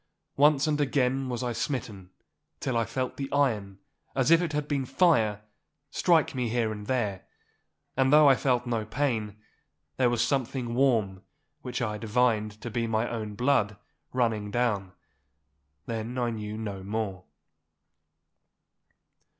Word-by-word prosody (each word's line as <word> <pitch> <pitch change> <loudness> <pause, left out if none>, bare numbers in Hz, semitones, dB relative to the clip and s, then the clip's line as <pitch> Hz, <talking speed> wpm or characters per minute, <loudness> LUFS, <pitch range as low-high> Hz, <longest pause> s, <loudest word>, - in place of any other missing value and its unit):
Once 145 0 +4
and 150 -1 +1
again 135 -1 +1
was 125 0 -3
I 120 -1 -1
smitten, 110 - -4 0.5
till 130 - -2
I 115 -1 +2
felt 125 +3 -3
the 135 -1 -4
iron, 110 -9 0 0.4
as 130 +2 +2
it 165 -1 +4
had 150 -1 -2
been 140 -2 0
fire, 115 - +2 0.5
strike 165 -3 +3
me 125 -3 -1
here 115 -1 0
and 105 -1 -7
there. 105 -8 -1 0.7
And 130 0 +3
though 150 0 +7
I 135 - +8
felt 125 -2 +1
no 115 -3 -1
pain, 110 -3 -2 0.6
there 125 -2 +3
was 120 -1 +1
something 130 -3 -1
warm, 115 -8 +2 0.4
which 125 -1 -3
I 105 -2 -2
divined 110 -2 +1
to 120 - -6
be 115 0 -1
my 110 +1 0
own 110 -3 -4
blood, 115 -4 +1 0.3
running 115 -5 0
down. 105 -5 -1 0.9
Then 115 +2 -4
I 120 -1 0
knew 105 -1 -5
no 100 -3 -5
more. 100 -2 -3
120 Hz, 140 wpm, -28 LUFS, 105-135 Hz, 0.9 s, I